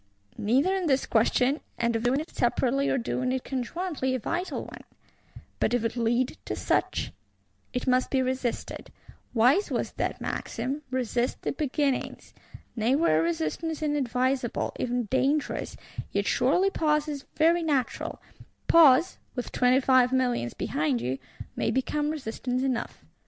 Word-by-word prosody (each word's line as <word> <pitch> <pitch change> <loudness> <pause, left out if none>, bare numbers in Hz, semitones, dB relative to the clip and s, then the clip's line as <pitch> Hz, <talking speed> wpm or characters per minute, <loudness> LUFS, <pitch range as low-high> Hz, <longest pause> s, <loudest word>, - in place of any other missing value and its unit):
Neither 265 - +2
is 375 -3 -1
this 270 -2 +2
question, 250 +5 +2 0.2
of 235 -1 0
doing 250 +4 +2
it 315 - -10
separately 260 +3 +1
or - - +2
doing 255 +1 -1
it 260 -1 -1
conjointly, 270 +1 -2
a - - -1
vital 345 - -3
one: - - -11 0.8
but 240 - +2
if 235 -2 0
it 230 - -1
lead 240 +2 0
to - - -3
such? - - 0 0.6
It 250 - -3
must 255 -1 +2
be 265 -1 +2
resisted; 255 -2 -3 0.4
wise 255 - +4
was - - -2
that - - -2
maxim, 280 +3 -3
Resist 250 -1 -1
the - - 0
beginnings! 285 -1 -2 0.4
Nay 235 +3 +2
were 220 - +3
resistance 170 - -2
unadvisable, 260 -3 0
even 245 0 0
dangerous, 270 +6 0 0.3
yet - - 0
surely 390 +2 +2
pause 300 -3 +1
is 285 -2 -5
very 335 +2 +4
natural: 285 -6 -1 0.5
pause, 325 +1 +6 0.2
with 245 - -4
Twenty 250 +1 +3
five 255 -1 +4
Millions 245 - 0
behind 145 -4 0
you, 125 +3 -3 0.4
may - - 0
become 295 +3 0
resistance 255 -3 -3
enough. 255 -3 -3
260 Hz, 140 wpm, -27 LUFS, 240-295 Hz, 0.8 s, pause